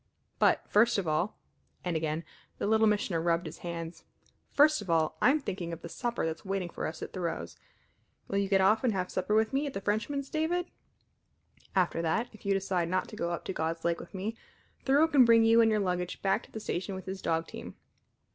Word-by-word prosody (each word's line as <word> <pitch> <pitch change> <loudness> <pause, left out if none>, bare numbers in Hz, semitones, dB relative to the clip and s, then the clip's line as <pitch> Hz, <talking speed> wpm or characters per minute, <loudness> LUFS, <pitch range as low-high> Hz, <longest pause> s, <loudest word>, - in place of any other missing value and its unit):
But, - - +3
first 225 +2 +4
of 195 -4 -1
all" 155 +7 0 0.5
and 175 -2 -1
again 160 +1 -1 0.3
the - - -2
Little 220 +1 +4
Missioner 200 -5 +1
rubbed 170 0 +1
his - - -8
hands 170 -1 -6 0.5
"first 300 -2 +5
of 200 - -9
all, 160 -2 +2
I'm 280 +5 +5
thinking 185 - -4
of 165 0 -7
the 170 - -6
supper 240 +3 -2
that's 160 0 -4
waiting 195 -3 -2
for - - -3
us 160 - -6
at - - -7
Thoreau's. 165 - -4 0.7
Will 200 - 0
you 200 -1 -1
get 195 -1 +4
off 210 +5 +4
and 240 -4 +2
have 185 -1 -2
supper 185 +3 0
with 220 +3 +2
me 280 +2 +1
at 275 - -5
the - - -1
Frenchman's, 265 +8 -2
David? 340 +3 -1 1.0
After 180 -3 +2
that, 220 +9 0
if 215 - -11
you 200 - +3
decide 185 -3 0
not 185 +1 0
to - - -9
go 170 - -2
up 170 - -4
to - - -3
God's 165 0 -3
Lake 170 0 +1
with - - -11
me, 205 +4 -3 0.5
Thoreau 285 +4 +5
can 285 -5 +6
bring 230 -1 +6
you 230 +1 +6
and 225 - +5
your 215 -1 +2
luggage 180 -2 -2
back 195 +3 +2
to - - -21
the 220 - -6
station 190 -1 -3
with 190 - -7
his 190 0 -5
dog 165 0 0
team. - - -9
195 Hz, 220 wpm, -30 LUFS, 170-225 Hz, 1.0 s, can